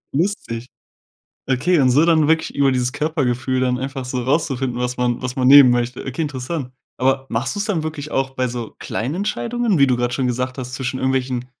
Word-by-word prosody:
Lustig. 140 - -2 0.8
Okay, 150 +6 +2
und 130 -1 +4
so 145 +6 +4
dann 160 -3 +3
wirklich 160 0 +1
über 140 -1 +3
dieses 125 -1 0
Körpergefühl 130 -5 -1
dann 125 -1 +1
einfach 135 0 -4
so 125 0 -3
rauszufinden, 130 -3 -1
was 125 0 -2
man 125 -1 0
was 130 0 -3
man 130 -2 +2
nehmen 140 -2 +9
möchte. 120 0 -1
Okay, 135 +5 -3
interessant. 135 -1 -4 0.3
Aber 135 +1 +1
machst 125 - -1
du's 205 - -1
dann 195 -8 -1
wirklich 155 -1 -5
auch 135 0 0
bei 130 -1 -1
so 120 -2 -6
kleinen 130 +8 -3
Entscheidungen, 215 0 -1
wie 140 - +6
du 125 -2 +2
grad 120 0 -1
schon 130 - 0
gesagt 125 +2 -2
hast, 125 0 -5
zwischen 130 0 -3
irgendwelchen, 130 -1 -1
130 Hz, 200 wpm, -20 LUFS, 125-150 Hz, 0.8 s, nehmen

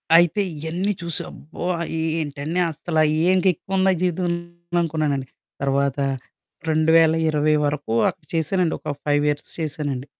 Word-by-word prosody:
అయితే, 175 +4 +5 0.2
ఇయన్నీ 170 +6 -1
చూసి 170 -1 -1
అబ్బో! 160 +3 -10
ఆహ్, 170 - -2
ఇ - - -1 0.2
ఏంటండి 150 +3 -3
అసలు 160 +1 -1 0.3
ఏం 185 0 +4
ఎక్కువ 195 +4 -4
ఉందా 190 0 +4
జీవితం 180 0 0 0.5
అనుకున్నానండి. 150 -5 -1 0.3
తర్వాత 140 0 +1 0.7
2020 160 -1 +4
వరకు 145 -5 -2 0.2
అక్కడ 155 - -10
చేశానండి 165 +2 +1
ఒక - - -4
5 145 0 +2
ఇయర్స్ 145 0 -3
చేశానండి. 145 -4 -3
155 Hz, 130 wpm, -23 LUFS, 145-170 Hz, 0.7 s, అయితే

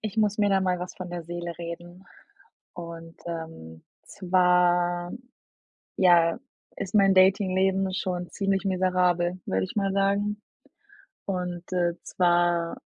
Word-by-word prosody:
ich 215 0 -5
muss 210 -1 +1
mir 205 - +3
da 195 -1 +3
mal 180 -1 0
was 180 0 -6
von 180 -1 -7
der 175 -1 -5
Seele 175 +1 -5
reden 175 +2 -8 0.7
und, 165 -1 -9
ähm, 160 - -7 0.2
zwar, 175 -1 +2 0.8
ja, 170 -3 +4 0.4
ist 195 +2 -5
mein 195 -2 +5
Dating-Leben 190 0 +3
schon 180 -1 -3
ziemlich 195 0 -1
miserabel, 180 -1 +1
würde 95 0 0
ich - - -10
mal 195 -2 0
sagen. 200 +1 0 0.8
Und, 180 -2 -3
äh, 175 -1 +1
zwar 175 -1 +1
180 Hz, 125 wpm, -26 LUFS, 175-190 Hz, 0.8 s, mein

